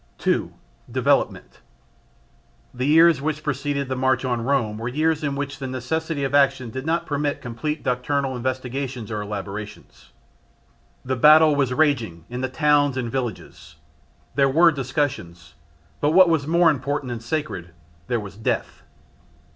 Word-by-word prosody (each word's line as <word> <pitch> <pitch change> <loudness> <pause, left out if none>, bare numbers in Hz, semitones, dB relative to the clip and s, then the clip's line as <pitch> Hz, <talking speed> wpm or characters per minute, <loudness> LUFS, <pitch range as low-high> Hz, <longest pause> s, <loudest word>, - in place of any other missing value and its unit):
2. - - 0 0.4
Development. - - 0 1.1
The 125 +2 -2
years 160 -1 +5
which 155 0 -3
preceded 140 -1 -2
the 130 - -2
March 130 0 +1
on 120 -2 -1
Rome 115 -5 0
were 115 - -4
years 155 +4 0
in 140 -2 -1
which 140 0 -4
the 135 - -4
necessity 145 +4 -3
of 135 - -2
action 135 -4 +2
did 130 +5 -6
not 170 +1 0
permit 145 -1 -2
complete 150 +6 -4
doctrinal 130 +2 -1
investigations 130 -1 -4
or 105 -1 -2
elaborations. 100 -10 -8 0.9
The 130 +1 -1
battle 155 +3 +6
was 135 -3 +1
raging 120 - 0
in 125 +1 -4
the 130 - -1
towns 145 -1 +2
and 120 -3 -3
villages. 100 - -5 0.6
There 135 0 +3
were 165 +5 +5
discussions, 130 - -3 0.5
but 150 +1 +1
what 185 0 +7
was 155 -4 +1
more 170 0 +4
important 140 -1 -3
and 120 -2 -5
sacred 120 - -4 0.4
there 120 -1 0
was 100 -2 -9
death. 110 - -3
135 Hz, 145 wpm, -23 LUFS, 120-150 Hz, 1.1 s, what